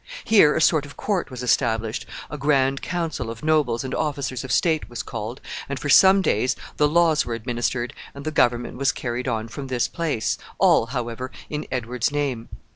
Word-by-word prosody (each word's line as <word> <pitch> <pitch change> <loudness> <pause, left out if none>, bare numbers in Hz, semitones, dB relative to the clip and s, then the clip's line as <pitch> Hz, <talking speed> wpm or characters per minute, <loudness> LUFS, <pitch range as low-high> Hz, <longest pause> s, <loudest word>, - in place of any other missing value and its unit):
Here 200 -10 +5
a 155 - +1
sort 155 -3 +4
of 145 - -14
court 200 -4 -1
was 125 -2 -7
established, 115 -3 0 0.2
a - - -4
grand 135 -2 +2
council 165 -9 -3
of 115 0 -8
nobles 150 -7 +2
and 130 - -5
officers 140 -5 -2
of 130 - -6
state 160 +5 +1
was 120 - -5
called, 115 +3 -6 0.3
and 140 - -3
for 145 - -4
some 190 +4 +7
days 125 - +1 0.2
the 150 - +4
laws 160 0 +3
were 115 - -3
administered 120 +1 -2 0.2
and 140 +1 -9
the 155 - -1
government 120 -4 +1
was 135 0 +2
carried 120 +1 -4
on 115 -2 -1
from 135 +4 -7
this 125 -2 0
place, 160 -10 -2 0.2
all, 115 - +4
however, 125 0 -4 0.2
in 150 0 -4
Edward's 125 0 -1
name. 140 -6 -2
130 Hz, 190 wpm, -23 LUFS, 120-150 Hz, 0.3 s, some